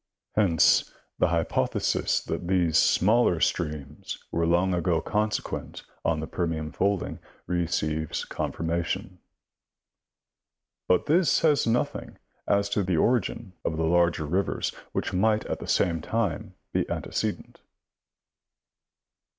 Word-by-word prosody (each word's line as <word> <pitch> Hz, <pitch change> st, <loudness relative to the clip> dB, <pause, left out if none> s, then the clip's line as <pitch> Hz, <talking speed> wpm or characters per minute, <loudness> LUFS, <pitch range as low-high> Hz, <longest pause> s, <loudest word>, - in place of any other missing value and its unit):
Hence 90 Hz, -7 st, +4 dB, 0.3 s
the -, -, +4 dB
hypothesis 85 Hz, -1 st, 0 dB
that 85 Hz, -, -4 dB
these 90 Hz, -4 st, +2 dB
smaller 105 Hz, -3 st, +3 dB
streams 75 Hz, -2 st, -2 dB
were 85 Hz, 0 st, +1 dB
long 90 Hz, +2 st, +2 dB
ago 85 Hz, -1 st, +1 dB
consequent 105 Hz, +5 st, -2 dB, 0.2 s
on 80 Hz, -2 st, +1 dB
the 80 Hz, -, -3 dB
Permian 80 Hz, -3 st, -3 dB
folding 100 Hz, +2 st, -1 dB, 0.3 s
receives 80 Hz, -3 st, -1 dB
con -, -, -3 dB
firmation; 85 Hz, +2 st, -3 dB, 1.7 s
but 90 Hz, -, +3 dB
this 165 Hz, +1 st, +3 dB
says 150 Hz, -6 st, +3 dB
nothing 115 Hz, +2 st, -1 dB, 0.3 s
as 100 Hz, 0 st, +2 dB
to 100 Hz, +1 st, +1 dB
the 90 Hz, -3 st, 0 dB
origin 110 Hz, -2 st, 0 dB
of 80 Hz, -, -2 dB
the 80 Hz, -, +1 dB
larger 85 Hz, -1 st, +2 dB
rivers, 90 Hz, +6 st, 0 dB, 0.2 s
which -, -, -2 dB
might 105 Hz, +3 st, +2 dB
at -, -, -3 dB
the -, -, -7 dB
same 85 Hz, -2 st, +1 dB
time -, -, -2 dB, 0.2 s
be -, -, 0 dB
antecedent. -, -, -3 dB
85 Hz, 120 wpm, -27 LUFS, 80-100 Hz, 1.7 s, Hence